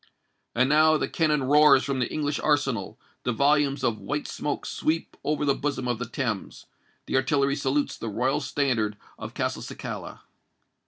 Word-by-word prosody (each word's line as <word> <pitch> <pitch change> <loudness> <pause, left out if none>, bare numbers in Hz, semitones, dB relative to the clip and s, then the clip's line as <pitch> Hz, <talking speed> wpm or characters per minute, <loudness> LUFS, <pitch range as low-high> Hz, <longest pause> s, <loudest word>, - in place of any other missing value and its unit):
And 130 +2 +3
now 155 +2 +5
the - - -1
cannon 150 -4 +1
roars 140 0 +6
from 135 -1 -2
the 125 - -1
English 145 -1 -1
arsenal: 135 -9 0 0.2
the 125 - -1
volumes 140 +2 +2
of 110 -2 0
white 145 +1 -3
smoke 145 - -3
sweep 160 +1 -2
over 150 0 0
the 140 - +3
bosom 140 -3 -2
of 120 -2 -1
the 125 - -4
Thames;—the 115 -2 -5
artillery 140 +1 +2
salutes 145 +1 -1
the 115 - -4
royal 130 +7 0
standard 125 -7 0 0.2
of - - -7
Castelcicala. - - -5
140 Hz, 155 wpm, -26 LUFS, 125-150 Hz, 0.2 s, roars